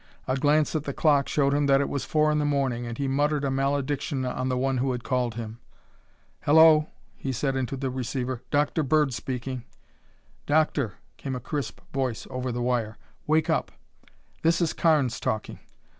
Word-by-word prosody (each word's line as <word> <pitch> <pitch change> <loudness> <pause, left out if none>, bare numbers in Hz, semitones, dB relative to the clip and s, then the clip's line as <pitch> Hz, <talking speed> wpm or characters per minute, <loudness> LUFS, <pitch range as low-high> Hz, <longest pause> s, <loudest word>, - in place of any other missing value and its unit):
A 130 - +1
glance 150 +3 +2
at 155 -1 -1
the 140 - -4
clock 145 -3 +3
showed 140 -2 +2
him 145 0 +2
that 135 0 +5
it 140 - +1
was 140 - -3
four 155 0 +2
in 150 - +1
the - - +1
morning 135 -5 0
and 115 0 -5
he 140 - -1
muttered 145 +2 +1
a 135 - 0
malediction 140 0 -1
on 130 +1 -2
the 125 - 0
one 135 0 0
who 130 0 0
had 125 -1 -5
called 125 -3 -1
him. 115 0 -6 0.8
"Hello," 155 0 +6 0.3
he 135 - -4
said 135 +2 -1
into 130 0 -2
the 130 -1 -2
receiver. 130 -1 -3
"Dr. 145 +2 +1
Bird 150 -1 +2
speaking." 125 0 -4 0.8
"Doctor," 145 -7 +2 0.2
came 135 -2 -4
a - - -3
crisp 130 -2 -4
voice 130 -4 -2
over 125 0 -3
the 120 0 -2
wire, 120 -3 -1 0.3
"wake 155 +1 +3
up! - - 0 0.7
This 165 +1 +3
is 170 -3 +1
Carnes 150 -8 +2
talking. 110 -1 -3
135 Hz, 185 wpm, -26 LUFS, 125-145 Hz, 0.8 s, Hello